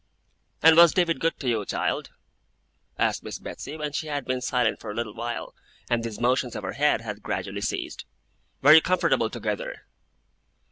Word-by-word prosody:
'And 160 Hz, 0 st, +8 dB
was 170 Hz, -1 st, +7 dB
David 175 Hz, -3 st, +2 dB
good 165 Hz, 0 st, 0 dB
to 135 Hz, -, -4 dB
you, 115 Hz, -4 st, +1 dB
child?' -, -, -2 dB, 0.9 s
asked -, -, +1 dB
Miss -, -, -6 dB
Betsey, 150 Hz, -, -8 dB
when 150 Hz, -1 st, -3 dB
she 155 Hz, +2 st, -3 dB
had 145 Hz, -2 st, -3 dB
been 130 Hz, 0 st, -2 dB
silent 125 Hz, -2 st, 0 dB
for 110 Hz, -, -8 dB
a 105 Hz, -, -5 dB
little 115 Hz, -2 st, -3 dB
while, 120 Hz, +1 st, -5 dB, 0.4 s
and 120 Hz, -1 st, +1 dB
these 115 Hz, -2 st, -5 dB
motions 125 Hz, 0 st, +1 dB
of 105 Hz, -, -5 dB
her 95 Hz, -, -3 dB
head 150 Hz, -3 st, +2 dB
had 105 Hz, -2 st, -6 dB
gradually -, -, -4 dB
ceased. -, -, -4 dB, 0.6 s
'Were 145 Hz, +3 st, +9 dB
you 160 Hz, -, +9 dB
comfortable 185 Hz, +2 st, +1 dB
together? -, -, -4 dB
130 Hz, 180 wpm, -26 LUFS, 115-155 Hz, 0.9 s, Were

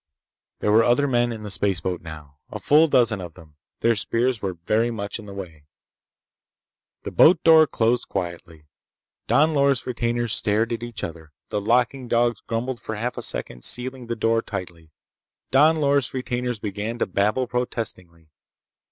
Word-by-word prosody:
There 105 Hz, -, +1 dB
were 110 Hz, +2 st, +5 dB
other 120 Hz, +5 st, +2 dB
men 120 Hz, -2 st, +1 dB
in 110 Hz, -2 st, -7 dB
the 105 Hz, -, -6 dB
spaceboat 95 Hz, -2 st, -1 dB
now. 75 Hz, -3 st, -11 dB
A -, -, -6 dB
full 155 Hz, +3 st, +4 dB
dozen 120 Hz, -8 st, +2 dB
of 85 Hz, -3 st, -9 dB
them. 75 Hz, -2 st, -17 dB, 0.2 s
Their 115 Hz, -, +3 dB
spears 115 Hz, +3 st, -1 dB
were 95 Hz, -2 st, -3 dB
very 110 Hz, +8 st, 0 dB
much 105 Hz, -2 st, -5 dB
in 105 Hz, -, -11 dB
the -, -, -9 dB
way. 80 Hz, -6 st, -9 dB, 1.4 s
The -, -, -5 dB
boat 170 Hz, 0 st, +5 dB
door 160 Hz, -1 st, +7 dB
closed 120 Hz, -1 st, 0 dB
quietly. 85 Hz, -4 st, -6 dB, 0.6 s
Don 155 Hz, +2 st, +3 dB
Loris' 140 Hz, -3 st, +2 dB
retainers 120 Hz, -2 st, -1 dB
stared 110 Hz, +3 st, 0 dB
at 115 Hz, -, -4 dB
each 120 Hz, -4 st, -7 dB
other. 80 Hz, -2 st, -8 dB, 0.2 s
The 105 Hz, -, -2 dB
locking 125 Hz, +4 st, +1 dB
dogs 120 Hz, -2 st, +1 dB
grumbled 120 Hz, +2 st, -3 dB
for 110 Hz, -, -5 dB
half 120 Hz, +4 st, -3 dB
a -, -, -5 dB
second, -, -, -5 dB
sealing 125 Hz, 0 st, +2 dB
the 115 Hz, -, -2 dB
door 115 Hz, 0 st, +1 dB
tightly. 85 Hz, -6 st, -8 dB, 0.6 s
Don 155 Hz, +5 st, +5 dB
Loris' 140 Hz, -3 st, +1 dB
retainers 125 Hz, -2 st, -2 dB
began 105 Hz, +2 st, -4 dB
to -, -, 0 dB
babble 105 Hz, +7 st, 0 dB
protestingly. 95 Hz, -10 st, -5 dB
115 Hz, 165 wpm, -23 LUFS, 95-125 Hz, 1.4 s, door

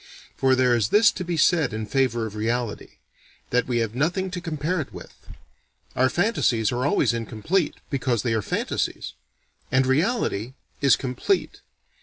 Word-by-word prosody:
For 130 Hz, -1 st, +3 dB
there 130 Hz, -1 st, +3 dB
is 110 Hz, -3 st, +1 dB
this 210 Hz, +1 st, +5 dB
to 185 Hz, -, -5 dB
be 175 Hz, -1 st, -3 dB
said 160 Hz, -4 st, +3 dB
in 110 Hz, 0 st, -3 dB
favor 120 Hz, -1 st, 0 dB
of 110 Hz, -, -6 dB
reality: 115 Hz, +1 st, -3 dB, 0.5 s
that 125 Hz, 0 st, +1 dB
we 125 Hz, -2 st, 0 dB
have 110 Hz, -, -10 dB
nothing 180 Hz, +8 st, -1 dB
to 180 Hz, -1 st, -4 dB
compare 160 Hz, +1 st, -2 dB
it 140 Hz, -, -8 dB
with. -, -, -11 dB, 0.8 s
Our 130 Hz, +1 st, +3 dB
fantasies 130 Hz, -, +1 dB
are 125 Hz, +3 st, 0 dB
always 135 Hz, -, +2 dB
incomplete, 115 Hz, -, -1 dB, 0.2 s
because 130 Hz, -4 st, 0 dB
they 120 Hz, -3 st, 0 dB
are 110 Hz, -, +1 dB
fantasies. -, -, -3 dB, 0.6 s
And 130 Hz, 0 st, +3 dB
reality 130 Hz, -, 0 dB, 0.3 s
is 140 Hz, -2 st, +5 dB
complete. 135 Hz, -, -2 dB
130 Hz, 160 wpm, -24 LUFS, 115-165 Hz, 0.8 s, this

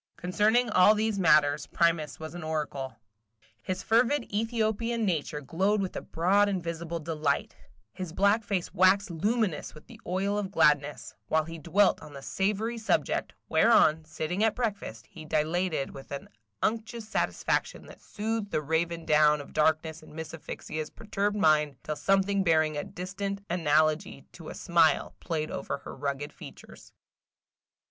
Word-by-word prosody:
Concerning 210 Hz, +7 st, +2 dB
all 210 Hz, +2 st, +6 dB
these 215 Hz, -1 st, 0 dB
matters, 150 Hz, -4 st, +4 dB
Primus 165 Hz, -4 st, +1 dB
was 160 Hz, 0 st, -7 dB
an 175 Hz, -, -7 dB
oracle. 145 Hz, -5 st, -3 dB, 0.7 s
His 185 Hz, -, -4 dB
fervid 240 Hz, +4 st, +3 dB
Ethiopian 225 Hz, +1 st, 0 dB
nature 155 Hz, -5 st, -1 dB
glowed 190 Hz, +9 st, 0 dB
with 190 Hz, -2 st, -3 dB
a -, -, -3 dB
broad 200 Hz, +5 st, +2 dB
and 190 Hz, -3 st, -2 dB
visible 170 Hz, 0 st, -4 dB
delight, 155 Hz, -3 st, -1 dB, 0.4 s
his 185 Hz, -3 st, -6 dB
black 200 Hz, +5 st, +2 dB
face 195 Hz, -4 st, -2 dB
waxed 185 Hz, +1 st, +4 dB
luminous 205 Hz, 0 st, -1 dB
with 155 Hz, -, -14 dB
the -, -, -15 dB
oil 195 Hz, +3 st, 0 dB
of 200 Hz, -2 st, -3 dB
gladness, 150 Hz, -6 st, +2 dB
while 160 Hz, 0 st, +2 dB
he 165 Hz, +1 st, -8 dB
dwelt 185 Hz, +6 st, +2 dB
on 150 Hz, -, -11 dB
the 140 Hz, -1 st, -9 dB
savory 210 Hz, -, -1 dB
subject, 220 Hz, -, 0 dB
whereon, 185 Hz, -9 st, +4 dB
sitting 160 Hz, +5 st, -3 dB
at 225 Hz, -, +2 dB
breakfast, 205 Hz, -, -3 dB
he 160 Hz, -, -12 dB
dilated 155 Hz, 0 st, -1 dB
with 135 Hz, -, -11 dB
an 140 Hz, -, -6 dB, 0.4 s
unctuous 225 Hz, 0 st, -2 dB
satisfaction 220 Hz, -, -1 dB
that -, -, -14 dB
soothed 220 Hz, -1 st, -3 dB
the 155 Hz, -, -1 dB
raven 165 Hz, +2 st, -1 dB
down 150 Hz, 0 st, +4 dB
of 145 Hz, -, -10 dB
darkness 155 Hz, +1 st, +1 dB
in 155 Hz, -, -15 dB
Miss 160 Hz, 0 st, -6 dB
Asphyxia's 155 Hz, -1 st, -6 dB
perturbed 205 Hz, -1 st, -2 dB
mind, 150 Hz, -6 st, +3 dB
till 155 Hz, -, -3 dB
something 195 Hz, +3 st, +2 dB
bearing 155 Hz, -3 st, +2 dB
a 145 Hz, -, -2 dB
distant 195 Hz, +2 st, -5 dB
analogy 155 Hz, -3 st, +1 dB
to 165 Hz, -3 st, -10 dB
a -, -, -7 dB
smile 165 Hz, -3 st, +2 dB
played 155 Hz, -3 st, -3 dB
over -, -, -3 dB
her -, -, -10 dB
rugged 145 Hz, +1 st, -4 dB
features. -, -, -13 dB
170 Hz, 155 wpm, -28 LUFS, 155-205 Hz, 0.7 s, all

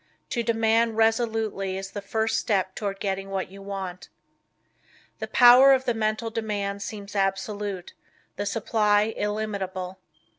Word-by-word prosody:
To 240 Hz, -, 0 dB
demand 225 Hz, 0 st, +2 dB
resolutely 225 Hz, -4 st, 0 dB
is 195 Hz, 0 st, -6 dB
the 205 Hz, -, -5 dB
first 220 Hz, +3 st, 0 dB
step 190 Hz, -3 st, 0 dB
toward 200 Hz, -1 st, -4 dB
getting 195 Hz, -1 st, -3 dB
what 190 Hz, -2 st, -3 dB
you 195 Hz, 0 st, -11 dB
want. 195 Hz, -2 st, -6 dB, 1.1 s
The -, -, -4 dB
power 250 Hz, +2 st, +8 dB
of 260 Hz, 0 st, +1 dB
the 240 Hz, -, +1 dB
Mental 220 Hz, +1 st, -1 dB
Demand 205 Hz, -3 st, -3 dB
seems 205 Hz, 0 st, -7 dB
absolute, 195 Hz, -1 st, -2 dB, 0.4 s
the 205 Hz, -, -3 dB
supply 210 Hz, 0 st, +1 dB
illimitable. 195 Hz, -3 st, -3 dB
205 Hz, 135 wpm, -25 LUFS, 195-225 Hz, 1.1 s, power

